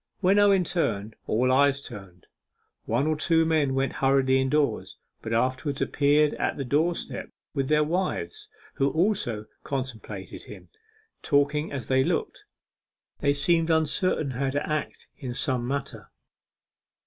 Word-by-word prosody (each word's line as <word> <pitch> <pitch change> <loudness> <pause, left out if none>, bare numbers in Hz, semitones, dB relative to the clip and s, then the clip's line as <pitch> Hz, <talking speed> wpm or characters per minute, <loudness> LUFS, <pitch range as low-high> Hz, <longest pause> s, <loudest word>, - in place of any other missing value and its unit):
When 195 +1 +4
Owen 200 -2 +5
turned, 110 - -2
all 125 +4 +2
eyes 140 +1 +4
turned; 95 -9 -11 0.6
one 120 +5 +1
or 155 0 +1
two 165 +1 +2
men 155 -4 +1
went 135 0 0
hurriedly 135 -1 +3
indoors, 140 +2 0 0.2
and 110 - -6
afterwards 130 +4 -1
appeared 150 +1 +2
at - - -1
the 140 - -3
doorstep 160 +7 -1 0.2
with 135 -3 -1
their 150 +1 +3
wives, 190 - -3 0.3
who 135 0 +2
also 160 - 0 0.2
contemplated 130 -4 -6
him, - - -12 0.5
talking 150 +1 +1
as 135 -5 -4
they 130 +2 +2
looked. - - -2 0.7
They 140 -1 +2
seemed 165 +3 +2
uncertain 160 -1 +1
how 135 +2 -1
to 145 +2 -2
act 155 -1 -3
in 125 -4 -5
some 125 -2 0
matter. 140 0 -4
140 Hz, 135 wpm, -26 LUFS, 130-160 Hz, 0.7 s, Owen